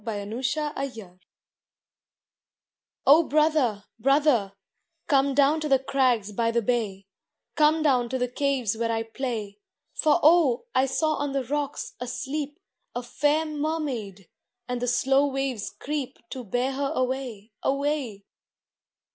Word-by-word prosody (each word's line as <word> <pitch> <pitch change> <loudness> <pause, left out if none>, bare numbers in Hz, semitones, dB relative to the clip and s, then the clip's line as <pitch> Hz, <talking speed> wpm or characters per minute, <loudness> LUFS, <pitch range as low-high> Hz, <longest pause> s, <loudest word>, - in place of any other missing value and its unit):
THE 205 -3 -4
LITTLE 265 +7 -2
BROTHER 220 -10 -7 1.9
O 300 +4 +8
BROTHER, 300 -9 +2 0.2
brother, 275 -6 +3 0.5
come 275 -1 +2
down 290 +3 +4
to 305 - -2
the 270 - +6
crags 255 -6 +1
by 230 +2 0
the 230 0 +1
bay, 205 -5 -1 0.5
Come 310 0 +4
down 250 -5 +2
to 260 - -1
the 250 0 0
caves 255 -4 0
where 230 0 -1
I 225 0 0
play; 225 -4 -5 0.3
For 310 +2 +3
oh! 305 - +5
I 260 +1 +3
saw 310 +3 0
on 285 -1 -2
the 275 -1 0
rocks, 285 +3 -3
asleep, 285 +4 -4 0.4
A 245 - -3
fair 295 +5 +1
mermaid, 290 - -3 0.4
and 250 -1 -3
the 245 - -1
slow 270 +3 +3
waves 265 -6 -2
creep 290 -2 -5
To 260 -2 -5
bear 245 +5 -1
her 275 +1 -2
away, 250 -5 -3
away. 275 -7 -1
265 Hz, 135 wpm, -26 LUFS, 230-290 Hz, 1.9 s, O